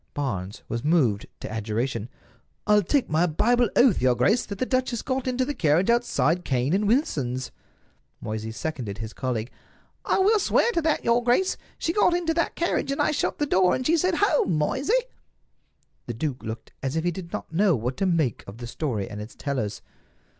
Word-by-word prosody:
Barnes 100 -9 -3
was 115 0 -3
moved 135 -11 +2
to - - -6
adjuration: 115 +2 -2 0.6
"I'll 210 0 +5
take 260 - +1
my 160 +3 +2
Bible 240 +8 +2
oath, 245 - +5
your 125 -1 +3
grace, 215 - +2
that 200 - -6
the 255 - 0
duchess 255 -3 -1
got 260 -1 -2
into 255 0 0
the 290 - -2
carriage 175 - +2
outside 180 -8 +1
Cane 130 +3 0
and 205 +2 +1
Wilson's." 135 - 0 0.7
Moysey 110 +1 -4
seconded 115 -6 -4
his 110 +1 -6
colleague. 125 -2 -3 0.5
"I - - +1
will 415 +3 +4
swear 470 - +2
to 335 - 0
that, 315 -1 0
your 235 +1 +3
grace. 250 +11 +2 0.2
She 330 - -1
got 355 -3 +3
into 340 -2 0
that 335 +1 -1
carriage, 340 -5 0
and 275 - -3
I - - +3
shut 300 - -1
the 295 - 0
door, 185 -8 +3
and 255 - -4
she 325 - +4
said, 360 +2 +1
'Home, 300 - +2
Moysey!'" 285 - +1 1.0
The 120 - -4
duke 135 +1 -3
looked 110 0 -7
as 135 +2 -2
if 160 - 0
he 175 - +1
did 170 0 -8
not - - -6
know 190 0 +3
what 125 +2 -3
to 195 - +1
make 160 - 0
of 100 +2 -9
the 120 - -7
story 120 -5 -3
and 105 - -7
its 105 - -9
tellers. 120 -8 -3
170 Hz, 195 wpm, -25 LUFS, -, 1.0 s, I'll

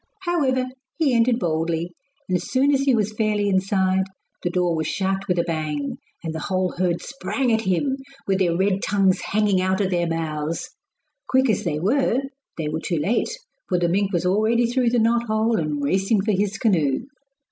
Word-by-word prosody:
However, 275 -8 +1 0.3
he 305 -6 +2
entered 235 0 +3
boldly, 165 -2 -1 0.4
and 185 - 0
as 180 - -2
soon 275 +2 +3
as 275 - +2
he 275 -2 +3
was 215 -1 0
fairly 210 -1 0
inside 190 -1 +2 0.4
the 175 - -1
door 175 -1 +1
was 160 -1 -1
shut 195 +2 -1
with 180 - +1
a 170 - +3
bang, 155 -4 -3 0.3
and 160 -1 -3
the 160 - -4
whole 185 +1 -1
herd 175 -1 -1
sprang 270 -2 -1
at 220 - +2
him, 225 +8 0 0.3
with 195 -1 +1
their 170 -3 +2
red 195 +1 +1
tongues 195 -2 +2
hanging 205 -2 +1
out 190 0 +1
of 195 -2 0
their 175 -1 +1
mouths. 160 -1 -3 0.6
Quick 260 -2 +3
as 210 - -1
they 150 -3 -1
were 245 - +2 0.4
they 160 -2 -2
were 155 +1 -2
too 170 - -1
late, 190 +11 +1 0.4
for 180 - +2
the 175 0 +1
mink 195 +3 +1
was 175 -2 0
already 220 +5 +3
through 245 +1 +1
the 245 - +1
knot 235 +1 +2
hole 220 0 +1
and 150 -2 -2
racing 195 +7 +2
for 215 +2 0
his 200 +1 0
canoe. 160 - +2
190 Hz, 195 wpm, -23 LUFS, 170-225 Hz, 0.6 s, entered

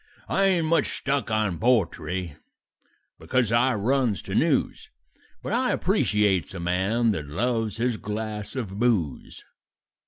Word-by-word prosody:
"I 195 - +2
ain't 180 -4 +2
much 160 -1 +1
stuck 140 -5 -1
on 105 -6 0
poetry, 90 - 0 0.8
because 125 -4 0
I 120 +2 +3
runs 115 - 0
to - - -7
news, - - +1 0.5
But - - -3
I - - +1
appreciates 100 -4 +1
a - - -5
man 95 +7 +1
that 75 -8 -4
loves 115 +5 -1
his 120 -1 0
glass 105 +1 -5
of 105 -6 -4
booze. 110 - -1
110 Hz, 130 wpm, -25 LUFS, 95-125 Hz, 0.8 s, I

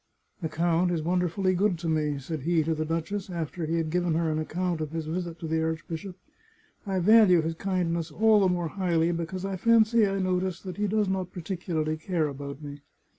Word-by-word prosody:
" - - -42
The 160 - -2
count 170 +2 +1
is 165 -3 -1
wonderfully 180 +2 +1
good 190 0 +1
to 165 +1 -5
me," 150 -2 0
said 155 +4 -5
he 165 +2 +2
to 160 +1 0
the 155 0 -2
duchess, 165 +5 -3
after 170 -1 -4
he 165 - 0
had 160 -2 -1
given 175 -1 +1
her 165 -1 +1
an 155 - -1
account 170 +1 -2
of 155 - -3
his 165 -1 -3
visit 170 +1 -4
to 165 - -6
the 160 0 0
archbishop. 160 +3 -4 0.4
" - - -28
I 190 -1 0
value 185 -3 +6
his 165 +1 -1
kindness 170 -2 -1
all 215 +6 +4
the 190 -2 +3
more 175 -2 -1
highly 170 -2 +1
be 170 -1 -2
cause 185 +2 -5
I 195 -1 -3
fancy 230 +1 +4
I 195 0 -1
notice 185 -1 0
that 185 -1 -7
he 210 0 0
does 210 0 +1
not 190 -1 -2
particularly 165 -3 -3
care 160 -1 -1
about 140 +1 -7
me. 145 0 -8
170 Hz, 225 wpm, -27 LUFS, 160-185 Hz, 0.4 s, value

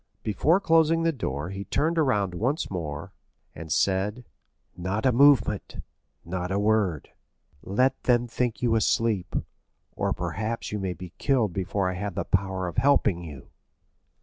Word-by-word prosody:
Before 145 - +2
closing 165 -2 +3
the 165 - +3
door 80 - -4
he 95 0 -5
turned 165 +9 0
around 105 - +1
once 125 - -1
more, 75 -5 -5 0.4
and 80 -1 -9
said, 100 +7 0 0.5
"Not 95 +6 -3
a 130 - +5
movement—not 105 -8 +1
a 95 - +1
word; 100 -7 +1 0.5
let 130 +7 +1
them 120 -1 +3
think 120 0 -2
you 120 -2 +3
asleep, 110 -3 +1 0.6
or - - -1
perhaps 100 +7 -3
you 105 - -2
may 95 -2 -2
be 90 0 -10
killed 125 -9 +1
before 95 +1 -1
I 90 - -1
have 100 0 -4
the - - -2
power 95 -1 -1
of 85 - -7
helping 105 -10 +3
you." 75 -6 -10
105 Hz, 150 wpm, -26 LUFS, 90-125 Hz, 0.6 s, a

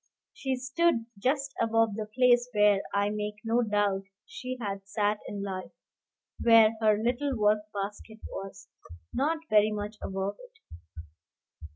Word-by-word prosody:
She 270 - -2
stood 260 0 +1
just 275 +4 0
above 225 -1 +2
the 215 +1 -4
place 245 +2 +3
where, 210 -1 +5
I 200 +1 +1
make 210 0 -3
no 230 +2 +2
doubt, 205 -3 0 0.2
she 255 0 -6
had 195 -3 -5
sat 210 0 0
in 200 -1 -5
life, 190 -2 -5 0.7
where 225 -2 +6
her 215 -1 +4
little 245 +4 -1
work 210 0 +1
basket 205 +2 -6
was, 195 0 -8 0.5
not 305 +5 +1
very 215 -3 +4
much 210 0 -5
above 195 +1 -3
it. - - -15
215 Hz, 140 wpm, -29 LUFS, 205-245 Hz, 0.7 s, where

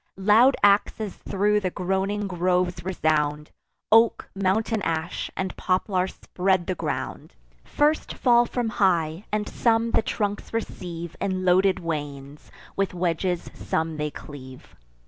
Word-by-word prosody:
Loud 215 +7 +5
axes 205 0 +3
thro' 210 +2 +1
the 190 -3 -1
groaning 190 +3 -1
groves 180 -1 0
resound; 150 -4 0 0.4
Oak, 225 +1 +4
mountain 205 +3 0
ash, 165 -1 -2
and 190 -1 -3
poplar 185 0 0
spread 185 -1 -1
the 185 - -1
ground; - - -5 0.3
First 300 +1 0
fall 240 -1 +4
from 240 -3 -2
high; 175 -3 +1
and 210 0 -1
some 230 0 +1
the - - +3
trunks 205 -2 -3
receive 170 -6 -5
In 185 -1 -1
loaden 185 +1 +3
wains; 145 -3 -5 0.2
with 195 -2 -1
wedges 175 0 -1
some 160 0 -2
they 150 0 -1
cleave. 130 -3 -11
185 Hz, 125 wpm, -25 LUFS, 165-210 Hz, 0.4 s, Loud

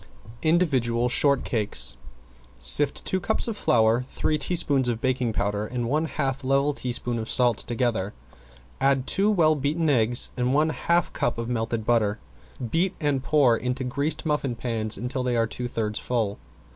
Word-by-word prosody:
~INDIVIDUAL 130 -8 +1
SHORTCAKES~ 120 - 0 0.6
Sift 135 - +3
two 190 - -1
cups 220 +6 +2
of 225 - -3
flour, 115 - +2
three 155 -1 -1
teaspoons 140 -7 +1
of 115 -2 -2
baking 125 -2 0
powder, 105 0 -2
and 120 0 -3
one 155 +5 0
half 135 -3 -3
level 140 +2 +1
teaspoon 120 -2 -2
of 110 - -6
salt 120 -3 +2
together. 115 -5 -1 0.7
Add 135 -1 +2
two 200 +7 +1
well 165 -7 +3
beaten 150 +2 0
eggs 120 -2 +4
and 125 +1 0
one 155 +2 +3
half 170 +1 0
cup 120 - -1
of 115 0 -4
melted 115 -2 -2
butter. 110 -3 +1 0.5
Beat 175 +3 +1
and 145 -4 0
pour 135 -5 +3
into 125 +3 -3
greased 140 +7 -1
muffin 145 -5 -1
pans 115 -2 -2
until 125 +2 -3
they 125 -1 -1
are 115 - +2
two 120 +2 -5
thirds 110 -3 -2
full. 110 -5 -2
125 Hz, 160 wpm, -25 LUFS, 115-145 Hz, 0.7 s, eggs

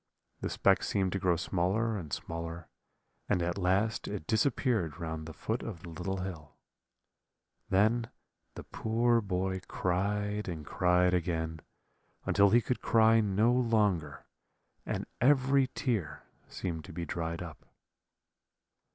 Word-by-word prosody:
The - - -3
speck - - +3
seemed 95 -2 0
to 95 - -1
grow 90 -2 +2
smaller 95 +6 0
and 85 -8 -6
smaller, 85 +2 -5 0.6
and - - +2
at 85 +3 -2
last 100 +4 +1
it 100 -6 -5
disappeared 110 - +1
round 80 -2 -4
the - - -6
foot 110 +8 -3
of 100 -6 -7
the 85 - -8
little 90 +3 -3
hill. 80 -6 -7 1.1
Then 110 +4 +2 0.5
the - - -7
poor 115 +1 +1
boy 95 -1 -2
cried 105 +3 -1
and 80 -4 -5
cried 90 +3 +2
again, 80 -2 -1 0.7
until 100 0 +4
he 120 +4 +5
could 125 - -2
cry 115 0 +5
no 105 +3 +2
longer, 105 - +1 0.6
and - - -2 0.2
every 135 0 +4
tear 115 - -2 0.2
seemed 80 -4 -4
to - - -10
be 85 +1 -4
dried 85 +1 -3
up. 80 -4 -10
95 Hz, 135 wpm, -31 LUFS, 85-110 Hz, 1.1 s, he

